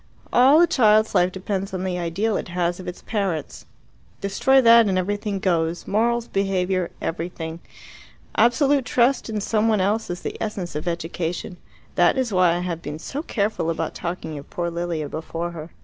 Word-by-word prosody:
All 265 +5 +6
a 345 - +7
child's 215 -7 +3
life 180 +1 +3
depends 190 0 -3
on 185 - -3
the 180 -1 -2
ideal 195 +6 -1
it - - -3
has 175 0 -1
of 185 - -8
its 180 - -7
parents. 195 -8 -3 0.5
Destroy 260 +7 +3
that 230 -2 +7
and 190 -2 +1
everything 205 +2 -1
goes 170 -3 0
morals, 235 +3 +1
behaviour, 190 -2 0
everything. 165 -1 -4 0.8
Absolute 275 +3 +3
trust 245 0 +2
in 215 -1 -2
some 215 +2 +1
one 215 -2 +3
else 210 +4 0
is 175 0 -4
the - - -5
essence 200 -5 -4
of 150 +3 -5
education. 170 +1 -3 0.4
That - - +3
is 250 -5 0
why 180 -2 +4
I 175 - -2
have 170 -2 -3
been 150 -1 -6
so 275 - -5
careful 210 - -1
about 165 -1 -2
talking 170 -2 -5
of 140 - -13
poor 170 -1 -3
Lilia 170 -3 -3
before 165 +3 -4
her." 165 -1 -8
185 Hz, 180 wpm, -23 LUFS, 170-220 Hz, 0.8 s, a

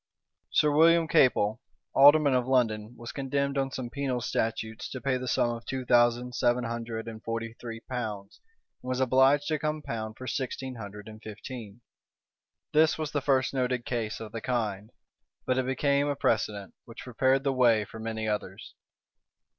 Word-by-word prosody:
Sir 150 - +3
William 165 +2 +5
Capel, 110 -7 +3 0.3
alderman 145 +1 +7
of 125 -1 +1
London, 115 -3 +1
was 120 0 -7
condemned 140 0 -1
on 135 -1 0
some 130 -2 -6
penal 135 -3 -2
statutes 110 -1 -3
to 130 - -6
pay 135 0 0
the 130 0 -4
sum 120 - +2
of 115 0 -6
two 130 -1 -3
thousand 120 0 +3
seven 120 0 +1
hundred 115 -1 -4
and 110 -1 -7
forty 115 0 -4
three 115 -1 -7
pounds, 110 -6 -6 0.4
and 125 - -7
was 130 0 -1
obliged 130 +3 +4
to 155 -1 0
compound 115 -8 -4
for 130 - -8
sixteen 130 +1 -3
hundred 105 -2 -9
and 110 0 -11
fifteen. 110 0 -9 0.9
This 155 +1 +4
was 155 -2 -3
the 145 - -1
first 130 -1 +1
noted 125 -2 -1
case 115 -3 -3
of 110 -2 -8
the 115 - -5
kind; 110 -5 -2 0.6
but 130 0 +1
it 130 - -1
became 140 +2 +1
a 145 - 0
precedent, 105 -5 -1
which 115 -1 -10
prepared 130 +2 +1
the 135 -1 +1
may 115 -5 +4
for 110 - -11
many 110 0 -3
others. 105 -3 -4
125 Hz, 170 wpm, -28 LUFS, 110-135 Hz, 0.9 s, alderman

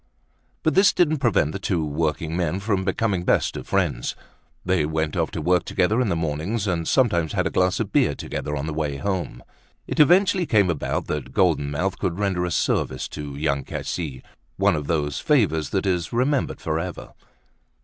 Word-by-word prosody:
But 160 - +2
this 195 +1 +5
didn't 155 -4 +2
prevent 115 - +2
the 95 - -5
two 90 -5 -1
workingmen 80 +3 -1
from 100 -2 0
becoming 95 -1 0
best - - +1
of - - -7
friends. - - 0 0.5
They 90 -4 +2
went 80 0 -1
off - - 0
to 80 - -5
work 90 +1 +3
together 105 +6 +1
in 120 - +1
the 85 - +1
mornings 80 +7 -2
and 85 -4 -1
sometimes 85 - +2
had - - 0
a - - -1
glass 90 0 +1
of - - -2
beer - - +2
together 75 0 -4
on 70 - -3
the 80 - -3
way 75 -2 -2
home. 90 -8 -3 0.4
It - - -4
eventually 180 +3 +5
came 100 -5 +3
about 80 - -2
that 75 -3 -4
Golden 80 -6 +2
Mouth 90 +6 -2
could 85 -1 -1
render 95 -3 0
a - - -2
service - - 0
to 75 -2 -7
Young 70 -1 -1
Cassis, 70 -7 -5 0.3
one - - +3
of 75 -2 -4
those 75 -3 -1
favors 80 - +2
that 95 0 -1
is 90 -3 0
remembered 130 +3 0
forever. 80 +2 -4
85 Hz, 185 wpm, -23 LUFS, 75-100 Hz, 0.5 s, this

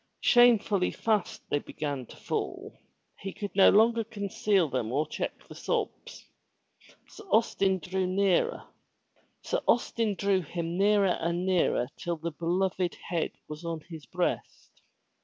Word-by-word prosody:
Shamefully 225 -6 +4
fast 215 -4 -1
they 145 - +2
began 140 -4 -5
to - - -13
fall. - - -4 0.4
He 195 - -5
could 205 +1 -7
no 195 - +7
longer 230 +2 +4
conceal 205 -4 0
them 125 -5 -2
or 145 +4 +1
check - - -5
the - - -10
sobs. - - -4 0.8
Sir 425 - -13
Austin 195 -5 +2
drew 185 +2 -3 2.4
him 170 +1 -4
nearer 200 -2 +3
and 170 +2 -1
nearer 180 -9 +2
till 170 -1 -3
the 165 +2 -4
beloved 180 +2 -1 0.2
head 170 -2 -1
was 150 +2 -8
on 165 -1 -4
his 160 -3 -11
breast. - - -3
180 Hz, 120 wpm, -28 LUFS, 165-205 Hz, 2.4 s, no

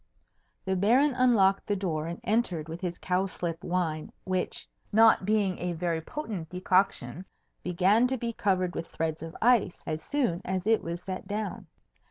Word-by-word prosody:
The 190 0 0
Baron 245 +10 +4
unlocked 225 -7 +3
the 205 - +1
door 165 -5 -2
and 170 +1 -5
entered 190 -8 0
with 165 +2 -7
his 175 -2 -3
cowslip 180 -2 -2
wine, 170 -4 -2
which 185 -1 -2 0.2
(not 220 -2 +5
being 205 -3 +1
a 175 0 -2
very 165 -1 -1
potent 200 - -5
decoction) 180 -5 +1 0.4
began 190 +7 +3
to 260 +1 -1
be 235 -1 -3
covered 185 -4 0
with 165 - -4
threads 160 -1 -3
of 165 0 -7
ice 235 -7 +3
as 155 -1 -2
soon 240 - 0
as 185 0 -2
it 225 0 +3
was 170 +1 -5
set 185 0 -5
down. 210 +1 -4
185 Hz, 165 wpm, -28 LUFS, 170-215 Hz, 0.4 s, not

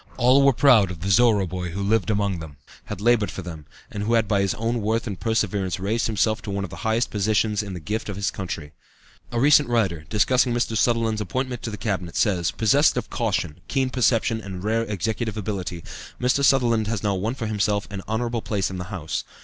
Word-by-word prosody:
All 130 +3 +5
were 140 - +6
proud 125 -7 +5
of 90 -3 -8
"the 95 +2 -1
Zorra 110 -3 +4
boy" 90 0 -4
who 95 +4 -5
had 100 - -1
lived 110 -5 +2
among 100 -4 0
them, 75 -3 -10 0.3
had - - -6
labored 115 -3 +3
for 95 - -7
them, 80 -3 -9 0.2
and 100 - -5
who 110 +3 0
had 115 -2 +2
by 100 -2 +2
his 100 -1 0
own 115 +1 -1
worth 110 +2 0
and 100 -6 -5
perseverance 100 -5 -1
raised 110 +5 0
himself 110 0 0
to - - -8
one 100 0 -2
of 95 - -6
the - - -8
highest 110 +1 0
positions 105 0 +1
in 100 -2 -6
the - - -5
gift 105 +6 -4
of 100 - -4
his 100 0 -1
country. 80 -6 -6 0.6
A 120 - -1
recent 145 0 +5
writer, 95 -10 0
discussing 125 +3 +2
Mr. 120 -1 -1
Sutherland's 115 -1 +1
appointment 125 +4 -3
to - - -4
the 105 - -6
Cabinet, 95 -4 -3
says: 90 -6 +1
"Possessed 135 +7 +3
of - - -3
caution, 75 - -1
keen 135 -2 0
perception, 115 -2 +1
and 95 -3 -7
rare 110 +2 +1
executive 110 +2 -2
ability, 95 -5 -4 0.4
Mr. 130 +3 +1
Sutherland 120 -6 +3
has 110 -3 -2
now 100 -1 +1
won 105 +6 -2
for 120 - -4
himself 105 -1 0
an 100 -2 -5
honorable 115 +2 -1
place 100 -4 -1
in 95 - -5
the 90 - -5
House. 90 -5 -4
105 Hz, 220 wpm, -24 LUFS, 95-115 Hz, 0.6 s, were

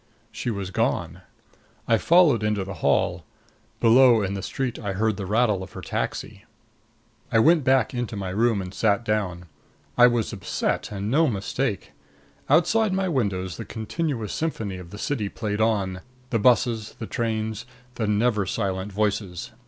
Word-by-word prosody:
She - - -4
was 100 -4 -4
gone. - - -1 0.7
I 115 -1 +3
followed 165 - +5
into 105 -2 0
the 95 +1 -6
hall. 85 -1 +1 0.6
Below, 120 -1 +6
in 95 0 -2
the 100 - -4
street, 130 +1 -3
I 100 -3 -3
heard 110 +2 0
the 100 -2 -5
rattle 105 -2 +2
of 95 - -9
her - - -7
taxi. 105 -2 -4 0.9
I 115 - +3
went 160 +6 +5
back 130 -3 +3
into 120 -3 -3
my 95 -2 -4
room 110 +1 +1
and 90 +1 -8
sat 110 +2 +1
down. 90 -5 -1 0.5
I 125 - +9
was 120 -2 0
upset, 95 +1 -2
and 100 +1 -3
no 160 +4 +4
mistake. 110 - -2 0.6
Outside 215 +4 +3
my 190 0 0
windows 100 - -1
the 115 - -5
continuous 115 - -3
symphony 110 - -3
of 90 -2 -10
the 105 - -9
city 105 -3 -2
played 105 -1 -3
on 100 -4 0 0.3
the 115 - +1
busses, 115 -1 +2
the 115 - -5
trains, 110 0 -3 0.3
the 110 -3 -2
never 105 -1 +1
silent 95 -1 -2
voices. 100 -1 -2
110 Hz, 160 wpm, -24 LUFS, 100-120 Hz, 0.9 s, I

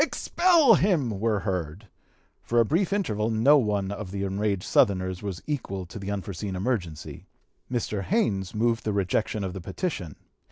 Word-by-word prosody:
Expel 335 -4 +4
him!" 145 - +1
were 110 -2 +1
heard. 90 0 -4 0.5
For 120 - +1
a 115 - +5
brief 175 - +1
interval 110 - 0
no 120 +7 +5
one 100 -4 -1
of 100 -1 -6
the 100 +1 -4
enraged 100 0 -1
Southerners 95 -2 +2
was 100 -4 -5
equal 100 -11 -3
to 90 - -9
the 95 0 -6
unforeseen 100 0 -4
emergency. 90 -7 -3 0.4
Mr. 110 -4 -2
Haynes 100 - 0
moved 115 +1 +1
the 105 - -1
rejection 100 +2 0
of 95 -2 -3
the 95 - -6
petition. 90 - -4
105 Hz, 160 wpm, -26 LUFS, 95-120 Hz, 0.5 s, a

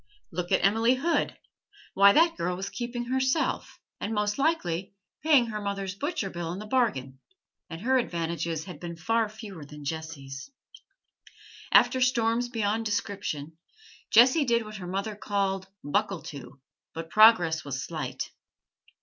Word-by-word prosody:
Look 175 +1 -4
at - - +3
Emily 225 +5 +4
Hood: 325 +6 0 0.6
why, 200 +1 +7
that 330 +7 +4
girl 180 +1 -1
was 195 +2 -5
keeping 240 +3 -4
herself, 260 +5 0 0.2
and, 220 +2 -3
most 210 +3 0
likely, 195 - 0 0.3
paying 290 -5 +5
her 215 -2 -4
mother's 200 -2 -3
butcher's 215 - -3
bill 170 -1 -4
into 195 +4 -6
the - - -13
bargain, 135 - 0 0.5
and 165 +1 -7
her 260 +3 +3
advantages 170 -6 -2
had 180 -6 -9
been 170 0 -6
fewer 215 -2 -2
than 150 0 -11
Jessie's. 145 - -6 1.2
After 260 - +5
storms 240 -1 +2
beyond 220 -1 0
description, 185 -7 -3 0.5
Jessie 255 +7 +6
did 235 -2 +2
what 215 0 -8
her 180 -2 -7
mother 195 +3 -3
called 195 -2 -1 0.2
'buckle 195 +3 -1
to,' 135 -2 -9 0.4
but 165 0 -6
progress 180 -8 +6
was 135 -2 -4
slight. 135 -6 -5
200 Hz, 140 wpm, -28 LUFS, 165-230 Hz, 1.2 s, why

